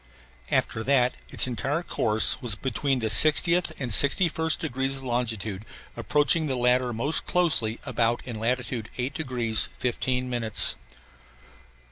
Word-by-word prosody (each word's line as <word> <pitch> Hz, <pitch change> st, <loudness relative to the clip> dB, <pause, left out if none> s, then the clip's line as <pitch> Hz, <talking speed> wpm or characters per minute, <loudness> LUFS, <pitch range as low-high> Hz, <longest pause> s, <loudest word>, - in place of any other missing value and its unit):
After 110 Hz, -, -2 dB
that 125 Hz, -1 st, +1 dB, 0.2 s
its -, -, +2 dB
entire 135 Hz, +6 st, -3 dB
course 110 Hz, -8 st, +3 dB
was 120 Hz, -5 st, +2 dB
between 135 Hz, +3 st, -2 dB
the 110 Hz, -, -1 dB
60th 155 Hz, +9 st, +3 dB
and 125 Hz, -4 st, -5 dB
61st 160 Hz, -, +2 dB
degrees 135 Hz, -3 st, -2 dB
of 135 Hz, -, -10 dB
longitude 110 Hz, -5 st, -4 dB, 0.3 s
approaching 150 Hz, +2 st, 0 dB
the 135 Hz, -, -3 dB
latter 125 Hz, 0 st, +1 dB
most 130 Hz, +8 st, 0 dB
closely 155 Hz, -11 st, +1 dB
about 115 Hz, 0 st, -1 dB
in 115 Hz, -4 st, -7 dB
latitude 120 Hz, -1 st, -3 dB
8 130 Hz, +2 st, -4 dB
degrees 125 Hz, -7 st, 0 dB
15 125 Hz, +1 st, -2 dB
minutes. 115 Hz, -4 st, +3 dB
125 Hz, 130 wpm, -24 LUFS, 115-140 Hz, 0.3 s, course